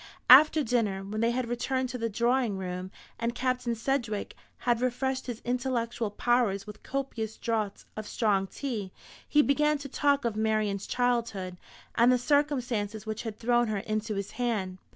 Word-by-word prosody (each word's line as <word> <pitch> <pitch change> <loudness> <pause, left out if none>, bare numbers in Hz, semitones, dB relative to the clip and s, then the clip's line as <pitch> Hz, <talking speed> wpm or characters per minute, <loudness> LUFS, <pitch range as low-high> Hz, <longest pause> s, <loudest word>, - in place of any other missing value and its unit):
After 305 +3 +8
dinner, 220 -6 0
when 210 +3 -4
they 230 - +3
had 245 0 -1
returned 255 +2 -1
to 250 0 -5
the 230 0 -1
drawing 235 -1 +1
room, 180 0 -4 0.3
and 235 +1 -1
Captain 250 -2 0
Sedgewick 230 -3 -2 0.2
had 240 -1 +1
refreshed 260 +1 -1
his 240 -3 -5
intellectual 240 -2 -1
powers 215 -2 +1
with 210 0 -10
copious 245 -5 -4
draughts 220 -4 -2
of 215 -1 -6
strong 200 -4 +1
tea, 215 -6 -4 0.4
he 295 0 +5
began 300 +2 +2
to 285 0 -7
talk 280 0 +1
of 230 -3 0
Marian's 215 -2 0
childhood, 235 -7 0 0.4
and 235 +2 +5
the 250 - +4
circumstances 245 -7 0
which 220 0 -3
had 220 -2 -6
thrown 240 0 +2
her 215 -1 -1
into 215 +1 -2
his 200 0 -4
hand. 205 -7 -2
235 Hz, 165 wpm, -29 LUFS, 215-255 Hz, 0.4 s, After